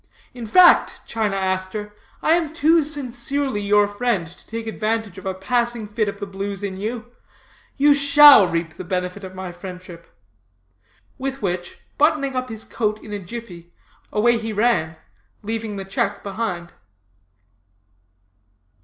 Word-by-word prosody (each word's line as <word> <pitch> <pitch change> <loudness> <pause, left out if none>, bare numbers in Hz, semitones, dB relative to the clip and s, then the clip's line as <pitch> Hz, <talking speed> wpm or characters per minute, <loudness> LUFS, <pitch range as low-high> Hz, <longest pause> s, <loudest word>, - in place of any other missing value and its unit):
In 240 -3 -7
fact, 360 +11 +5
China 215 -3 -1
Aster, 190 +2 -3 0.3
I 315 - +4
am 330 -3 0
too 325 +1 +4
sincerely 275 -3 -2
your 205 0 +3
friend 205 -3 -1
to 165 - -17
take 230 0 -5
advantage 220 -3 -2
of 190 - -8
a 190 - -2
passing 235 +2 0
fit 210 0 -1
of 200 - -8
the 200 - -4
blues 200 0 -5
in 190 -2 -4
you. 230 +4 -5 0.7
You 290 +1 +6
shall 285 - +8
reap 165 -1 -2
the - - -6
benefit 180 +2 -3
of 185 0 -9
my 185 -1 -6
friendship.' 180 -1 -10 1.1
With 270 -2 -4
which, 175 -2 -3 0.2
buttoning 285 -3 +2
up 255 0 -2
his 220 0 -6
coat 215 -2 -2
in 210 - -8
a 205 - -3
jiffy, 180 -4 -9 0.4
away 235 +2 +3
he 220 -1 -4
ran, 205 -8 +1 0.5
leaving 220 0 -4
the 195 -1 -6
check 200 +1 -2
behind. 195 -4 -4
210 Hz, 145 wpm, -21 LUFS, 190-240 Hz, 1.1 s, shall